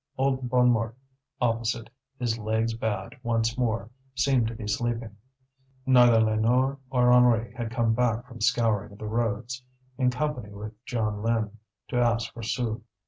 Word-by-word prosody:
Old 130 -1 0
Bonnemort 120 -2 +3 0.4
opposite, 115 -1 0 0.3
his 115 -3 -1
legs 110 +1 0
bad 105 -4 -3
once 115 -1 0
more, 115 -3 -1 0.2
seemed 130 -3 +2
to 115 - -5
be 110 -2 -7
sleeping; 115 0 -2 0.7
neither 120 -3 +6
Lénore 120 +5 +2
nor 125 -1 +4
Henri 120 -2 +4
had 120 -2 -4
come 115 -1 +1
back 120 0 +1
from 120 -3 -12
scouring 110 -4 +1
the 110 - -8
roads, 115 +3 -2 0.4
in 125 -1 +4
company 125 -4 -2
with 105 +2 -8
Jeanlin, 110 -1 -1 0.4
to 125 - -1
ask 120 -1 +1
for 115 - -8
sous. 115 0 -2
115 Hz, 140 wpm, -27 LUFS, 110-125 Hz, 0.7 s, neither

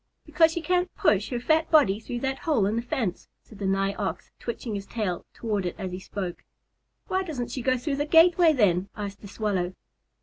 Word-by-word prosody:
"Because 325 -1 +4
she 340 - -3
can't 360 0 +1
push 205 0 +2
her 245 - -2
fat 315 +6 +2
body 215 -11 +5
through 240 +1 -5
that 265 0 -2
hole 285 -11 +2
in 205 +2 0
the 230 - 0
fence," 235 -6 -3 0.2
said 215 - -15
the 195 - -1
Nigh 195 +1 +1
Ox, 200 -1 -4
switching 235 -1 -4
his 200 -1 -5
tail 200 -7 -3
toward 210 -4 -2
it 175 - -3
as 190 -3 -4
he 180 - -5
spoke. 185 -2 -5 0.6
"Why 375 - 0
doesn't 295 -10 -4
she 260 - -3
go 255 +1 +2
through 275 +3 -2
the 290 +1 -1
gateway, 335 +1 +6
then?" 195 - +2
asked 200 -1 -5
the 205 - -9
Swallow. 190 -3 -2
225 Hz, 210 wpm, -26 LUFS, 195-295 Hz, 0.6 s, gateway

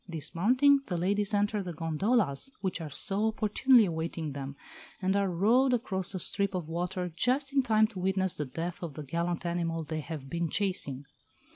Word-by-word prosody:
Dismounting, 230 - +3
the 180 - -2
ladies 200 +4 +1
enter 205 0 +1
the 180 -2 -5
gondolas 165 - 0
which 185 -3 -2
are 155 - -5
so 200 +8 0
opportunely 220 +3 +4
awaiting 165 -2 -3
them, 140 0 -6 0.4
and 190 0 +1
are 200 -1 +2
rowed 235 +9 +3
across 190 -6 -3
the - - -2
strip 200 +1 -1
of 175 -4 -3
water 180 +1 -3
just 270 +6 +1
in 275 - +4
time 220 -3 +4
to 215 -4 -6
witness 190 0 +1
the 150 - -3
death 165 +6 -5
of 165 -5 -6
the 155 - -6
gallant 170 +4 -2
animal 170 -1 -1
they 155 +1 -4
have 150 -3 -6
been 170 +3 -2
chasing. 165 -9 -1
185 Hz, 180 wpm, -30 LUFS, 165-210 Hz, 0.4 s, opportunely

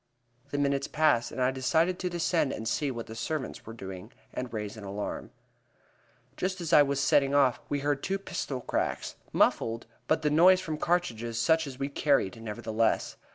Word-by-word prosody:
The 145 - -3
minutes 140 -1 +1
passed, 150 -7 +2
and - - -6
I 130 0 +3
decided 160 +8 +1
to 180 - -1
descend 170 -4 +1
and 110 - -5
see 145 +5 0
what 120 -3 -5
the 110 - -9
servants 130 +4 -4
were 115 - -7
doing, 95 -4 -8 0.2
and 125 -1 -4
raise 105 -1 -4
an 110 - -10
alarm. 100 +1 -5 1.1
Just 185 +1 -2
as 170 -1 -3
I 150 - +9
was 140 -1 +1
setting 140 0 +3
off 135 -3 +4
we 145 -1 -1
heard 145 -1 0
two 195 +1 -1
pistol 140 -8 -4
cracks, - - -2 0.2
muffled, 115 +1 +2 0.2
but 155 0 +1
the 150 - +2
noise 180 +4 +6
from 160 -4 -4
cartridges 120 -11 -1
such 160 +6 +3
as 130 -2 -8
we 135 +1 -2
carried, 140 -7 +1
nevertheless. 110 +1 -1
140 Hz, 185 wpm, -29 LUFS, 115-155 Hz, 1.1 s, I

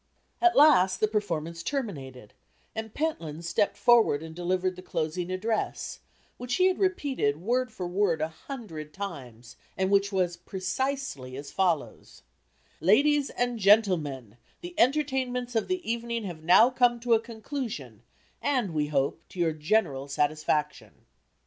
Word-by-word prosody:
At 355 0 +5
last, 195 -11 +6
the 215 - +3
performance 170 -6 -2
terminated 140 - -5 0.4
and 220 -1 -5
Pentland 170 - -3
stepped 200 +3 0
forward 220 -8 +4
and 160 0 -8
delivered 180 +2 -1
the 185 - -10
closing 170 0 -3
address, 215 +4 -2 0.4
which 250 0 -3
he 365 - +3
had 375 0 +2
repeated, 285 - 0
word 245 +6 0
for 185 -5 -5
word, 180 -2 +1
a 155 - 0
hundred 165 - -9
times, 125 - -8 0.2
and 190 +1 0
which 200 0 +3
was 180 -3 0
precisely 190 - -3
as 140 0 -8
follows: 180 -5 -2 0.6
"Ladies 280 - +4
and 245 -1 -2
Gentlemen: 165 - +2 0.2
The 350 0 -7
entertainments 255 -3 +1
of 225 - +1
the 370 -1 -3
evening 235 0 -2
have 175 -5 -6
now 215 +9 +6
come 245 -2 +3
to 240 -1 +2
a 225 - +5
conclusion, 235 +2 -6 0.4
and, 250 - 0
we 150 -1 0
hope, 140 +2 0
to 185 - -11
your 165 -2 +2
general 155 -4 0
satisfaction." 150 +1 -1
195 Hz, 145 wpm, -28 LUFS, 160-245 Hz, 0.6 s, last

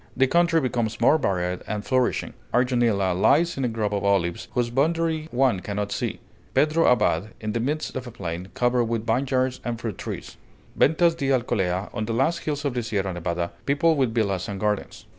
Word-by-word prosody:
The 135 - +5
country 170 +3 +3
becomes 120 -5 -1
more 140 +7 +4
varied 90 -5 -1
and 105 -1 -3
flourishing; 130 +3 0 0.2
Arjonilla 120 -7 +2
lies 155 - +3
in 135 - -2
a - - +2
grove 110 -3 -2
of 100 - -1
olives, 95 -4 +1
whose 120 -1 0
boundary 160 +3 0
one 125 - +2
cannot 100 +1 -3
see; - - -2 0.4
Pedro 155 +2 +3
Abad, 105 -4 +1
in 110 -1 -3
the 115 - -1
midst 150 +6 -2
of 130 -1 -4
a - - -7
plain, 90 -5 -5
covered 125 -1 +2
with 115 -1 -2
vineyards 130 +2 0
and 120 -1 -3
fruit 110 -5 -5
trees; - - -6 0.4
Ventas 165 +2 +4
di 140 -5 -2
Alcolea, 100 -7 0
on 110 - -2
the 115 - -2
last 155 +8 +1
hills 145 -1 -3
of 140 - 0
the 125 - -1
Sierra 100 -4 -2
Nevada, 85 0 -2 0.2
peopled 145 +2 +3
with 130 -4 +2
villas 100 -5 0
and 100 -1 -4
gardens. 105 0 -2
120 Hz, 195 wpm, -24 LUFS, 100-135 Hz, 0.4 s, The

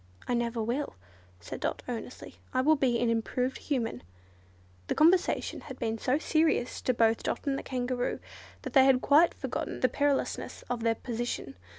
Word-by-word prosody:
"I - - 0
never 235 -1 0
will," 250 +6 -2 0.4
said 85 - -7
Dot, - - -2
earnestly, - - -7 0.2
"I 255 - +4
will 310 +4 +5
be 255 -4 +2
an 240 - +1
improved 240 +3 -1
Human." 235 - -2 0.9
This - - -1
conversation 340 +4 +3
had 265 -3 -9
been 225 -2 -2
so 255 +5 +1
serious 310 -5 +1
to 255 - +1
both 225 -1 +3
Dot - - -3
and 280 -1 +1
the - - -3
Kangaroo, 250 -1 -2 0.4
that - - -6
they 265 -3 +7
had 260 -1 +4
quite 305 +4 +5
forgotten - - -4
the 255 - +4
perilousness 285 +2 -1
of 245 -2 -2
their 225 0 +2
position. 240 - -4
250 Hz, 175 wpm, -29 LUFS, 235-280 Hz, 0.9 s, they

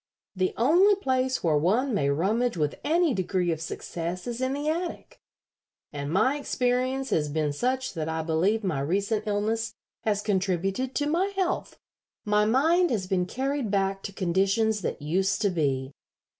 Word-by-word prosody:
The 185 0 0
only 350 - +5
place 260 -7 0
where 155 -3 +3
one 225 - +1
may 140 -9 +1
rummage 205 +9 +1
with 150 -2 0
any 330 -1 +2
degree 185 -3 0
of 160 -1 -3
success 170 +2 -5
is 240 0 -4
in 260 +1 0
the 290 +2 -3
attic, 335 +3 -3 0.7
and 145 0 -4
my 255 - +2
experience 255 0 0
has 150 -2 +1
been 150 -1 -1
such 255 - -1
that 160 -3 -3
I 160 0 -2
believe 180 +8 +1
my 175 -8 -1
recent 200 +9 -1
illness 220 +2 -1 0.3
has 210 -2 0
contributed 195 +5 -1
to 290 - +1
my 335 +6 +1
health. 375 -2 -1 0.5
My 210 0 +3
mind 325 +10 +3
has 205 -6 -1
been 185 -1 0
carried 270 +1 -2
back 195 -1 0
to 200 - -6
conditions 195 +4 +1
that 150 - -4
used 190 +6 +1
to 200 - +2
be. 135 -5 -1
205 Hz, 165 wpm, -27 LUFS, 175-260 Hz, 0.7 s, only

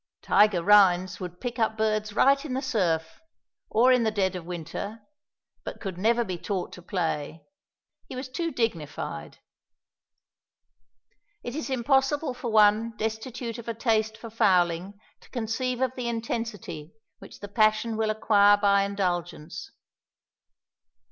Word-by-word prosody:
Tige 210 -1 +4
Rhines 185 -3 +5
would 180 -1 -7
pick 245 -1 -5
up 220 -1 +1
birds 215 -1 0
right 275 +4 +4
in 275 -5 -4
the 265 - -1
surf, 165 - -1 0.5
or 245 +4 +4
in 250 - +3
the 225 - +2
dead 195 -3 0
of 175 -2 -6
winter, 180 +5 -6 0.6
but - - -7
could 190 -4 -6
never 235 +4 +2
be 185 -5 -5
taught 190 -2 -3
to 180 - -10
play; 165 -4 -3 0.6
he - - -8
was 255 +1 -5
too 330 +6 -3
dignified. 170 - -3 2.1
It 240 - -5
is 310 -2 -4
impossible 270 +3 +1
for 250 -1 -5
one 215 +1 +4
destitute 230 +2 -4
of 235 - -10
a 230 - -3
taste 220 -1 0
for 225 0 -10
fowling 185 -2 +1 0.2
to - - -20
conceive 245 +1 -2
of 260 -2 +1
the 245 -2 -3
intensity 225 -8 -5 0.2
which - - -13
the 205 - -7
passion 215 +2 +2
will 220 0 0
acquire 205 -1 +4
by 200 -1 +3
indulgence. 175 -5 -3
215 Hz, 140 wpm, -26 LUFS, 185-235 Hz, 2.1 s, Rhines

